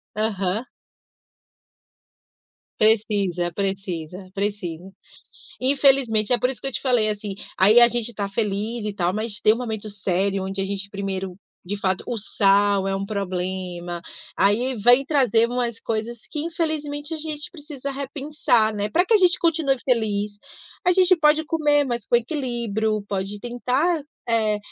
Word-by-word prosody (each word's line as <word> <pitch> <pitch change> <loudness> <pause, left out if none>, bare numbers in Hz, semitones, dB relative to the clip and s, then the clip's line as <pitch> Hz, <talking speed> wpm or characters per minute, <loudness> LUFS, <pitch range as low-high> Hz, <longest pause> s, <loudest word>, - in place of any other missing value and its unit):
Aham. 210 0 -1 2.1
Precisa, 200 -5 +2
precisa, 185 -2 -4
precisa, 195 -3 -3 0.7
infelizmente. 260 -5 +3
É 245 - +4
por 250 - +1
isso 265 - -5
que 270 - -2
eu - - -5
te - - -2
falei, 245 -5 +2
assim, 205 -1 -4 0.2
aí 210 +5 +6
a 240 - +10
gente 240 0 -1
tá 200 -1 -3
feliz 215 +2 -2
e 210 - -3
tal, 180 -2 0
mas 215 +1 -1
tem 215 - +6
um 225 - -2
momento 220 -3 -5
sério, 195 0 -1
onde 195 0 -3
a - - -1
gente 200 0 -4
primeiro, 195 -2 -4 0.3
de 200 +3 -4
fato, 190 -2 0
o 240 - -3
sal 200 -2 +2
é 195 - -1
um 195 - -3
problema. 185 -3 -4 0.3
Aí 235 +6 +2
vem 245 +5 +5
trazer 245 -6 +3
umas 240 -2 -2
coisas 225 +1 -3
que, 300 - -3
infelizmente, 310 -2 -3
a 320 - -3
gente 300 -1 -5
precisa 290 -4 -7
repensar, 275 -5 0
né, 205 0 -2
pra 345 +12 +2
que 420 - 0
a 435 - +7
gente 360 -2 +4
continue 315 -5 +2
feliz, 210 -4 0 0.5
a - - +6
gente 370 0 +5
pode 310 -1 +3
comer, 295 -2 +2
mas 240 -5 -4
com - - +4
equilíbrio, 235 -5 -1
pode 200 +1 -4
tentar, 255 - 0 0.3
eh, 220 -3 +1
220 Hz, 155 wpm, -23 LUFS, 200-270 Hz, 2.1 s, a